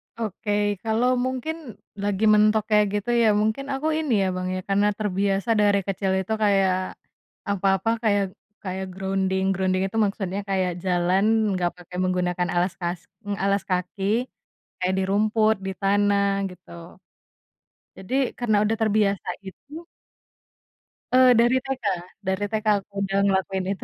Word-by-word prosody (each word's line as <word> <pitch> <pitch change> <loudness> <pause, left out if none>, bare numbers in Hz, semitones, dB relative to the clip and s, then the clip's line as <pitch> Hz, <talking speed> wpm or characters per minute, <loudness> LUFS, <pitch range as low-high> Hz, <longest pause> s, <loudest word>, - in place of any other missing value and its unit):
Oke 215 -2 -4 0.3
kalau 225 +2 +1 0.2
mungkin 260 +5 -3 0.5
lagi 205 0 -1
mentok 215 0 +4
kayak 210 0 +5
gitu 205 +2 -2
ya - - +5
mungkin 220 +6 -1
aku 270 +3 -2
ini 305 -6 0
ya - - +1
Bang 185 0 -3
ya - - -2
karena 200 +1 +3
terbiasa 200 0 -1
dari 205 -1 +4
kecil 195 0 -1
itu 190 - -7
kayak, 195 -2 +3 0.8
apa-apa 195 +1 +1
kayak 205 -2 +3 0.4
kayak 190 0 -4
grounding 190 0 -1
grounding 185 0 0
itu 195 - -5
maksudnya 195 -1 -3
kayak 185 -2 +1
jalan 180 +2 +2 0.3
enggak 180 -2 0
pakai 180 0 -10
menggunakan 180 -1 0
alas 175 +1 +1
kas 175 0 -2 0.4
alas 200 0 +1
kaki, 180 +2 -2 0.8
kayak 185 0 0
di - - +1
rumput, 215 +2 +2
di - - -1
tanah 200 0 +2 0.2
gitu, 180 0 -16 1.3
jadi 190 +7 -8 0.3
karena 225 -4 +2
udah 225 +1 0
terbiasa 210 -3 +1 0.2
gitu. 295 - -10 1.3
Eee, 255 0 +7
dari 240 +2 +4
TK 270 -2 -4 0.4
dari 190 +2 0
TK 220 0 -2
aku 200 +1 -10
udah 195 0 -1
ngelakuin 190 -1 0
itu. 195 - -10
200 Hz, 140 wpm, -24 LUFS, 190-215 Hz, 1.3 s, Eee